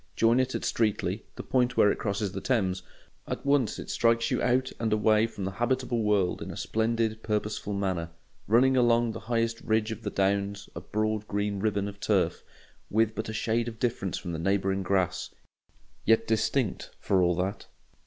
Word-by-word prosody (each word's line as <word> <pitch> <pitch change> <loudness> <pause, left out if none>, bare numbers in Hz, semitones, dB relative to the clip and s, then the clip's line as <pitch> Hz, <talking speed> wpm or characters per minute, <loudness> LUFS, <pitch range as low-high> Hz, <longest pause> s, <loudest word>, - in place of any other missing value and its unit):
Join 115 +2 +4
it 130 - 0
at - - -3
Streatley, 110 -3 0
the - - -6
point 125 -1 +1
where 105 - +6
it - - -3
crosses 100 -1 -1
the - - -5
Thames; 95 -7 0 0.5
at - - -4
once 140 -6 +2
it - - -7
strikes 115 0 +2
you - - +1
out 130 +1 +1
and 115 -2 0
away 110 +1 +3
from 100 -4 -6
the 95 - -2
habitable 120 +2 0
world 105 -4 +1
in - - -5
a - - -7
splendid, 110 0 0
purposeful 105 -1 -2
manner, 95 -4 -1 0.4
running 130 +5 +4
along 120 -2 +3
the 110 - -6
highest 115 0 -1
ridge 110 0 0
of 110 - -6
the 105 - -3
Downs 100 +1 0
a - - -5
broad 110 0 -2
green 100 0 -1
ribbon 100 -1 0
of 100 0 -8
turf, - - +1 0.5
with 110 +1 +2
but 110 0 -4
a - - -4
shade 115 +2 0
of 115 -1 -6
difference 110 -6 -1
from 90 - -5
the 80 - -4
neighbouring 95 +2 +1
grass, 95 -2 0 0.7
yet 115 +1 +4
distinct 110 +1 0
for 95 -2 +2
all 90 -1 +3
that. 95 +3 -3
110 Hz, 190 wpm, -28 LUFS, 100-115 Hz, 0.7 s, where